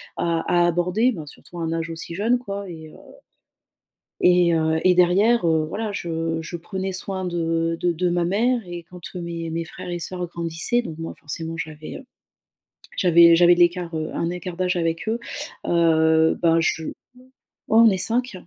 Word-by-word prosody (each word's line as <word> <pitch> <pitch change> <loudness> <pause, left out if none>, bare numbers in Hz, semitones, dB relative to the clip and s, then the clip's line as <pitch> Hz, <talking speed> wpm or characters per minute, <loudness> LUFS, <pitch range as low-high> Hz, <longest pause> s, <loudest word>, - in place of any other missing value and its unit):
à 170 -1 0
à 175 0 +3
aborder- 180 +8 +1
bon 160 -9 -7
surtout 170 +4 -12
à - - -4
un 165 0 -2
âge 165 0 -3
aussi 165 0 -6
jeune, 225 +6 +2
quoi- 200 -4 -6
et 160 -2 -9
heu - - -16 1.3
et 180 -1 +4
heu, 160 0 +1
et 185 -1 +4
derrière, 190 +5 +4
heu, 160 -2 +2
voilà 210 +4 -4
je 165 -3 -3
je 165 +2 -7
prenais 190 +2 -4
soin 190 0 -4
de 165 -1 -1
de 175 - +1
de 175 +2 -1
ma 175 0 0
mère 230 +7 +1
et 175 -1 -7
quand 180 -1 -12
mes 170 -2 -5
mes 165 +1 -3
frères 170 - -9
et 175 0 -3
sœurs 180 +1 -4
grandissaient 170 +8 -1
donc 165 -9 -8
moi 165 - -5
forcément 160 +2 -5
j'avais, 155 -1 -7
heu, 270 - -13 0.9
j'avais 170 -2 +6
j'avais 175 0 +6
de - - -4
l'écart, 175 -1 +2
heu, 155 0 -3
un 170 - -1
écart 180 0 -6
d'âge 185 0 0
avec 165 +2 -2
eux. 225 +2 -1 0.5
Heu, 160 -1 +3
bah 165 -1 +4
je 160 -1 -1
ouais, - - -5 0.8
on 225 +1 +7
est 190 - 0
5 240 +5 0
175 Hz, 190 wpm, -23 LUFS, 165-185 Hz, 1.3 s, on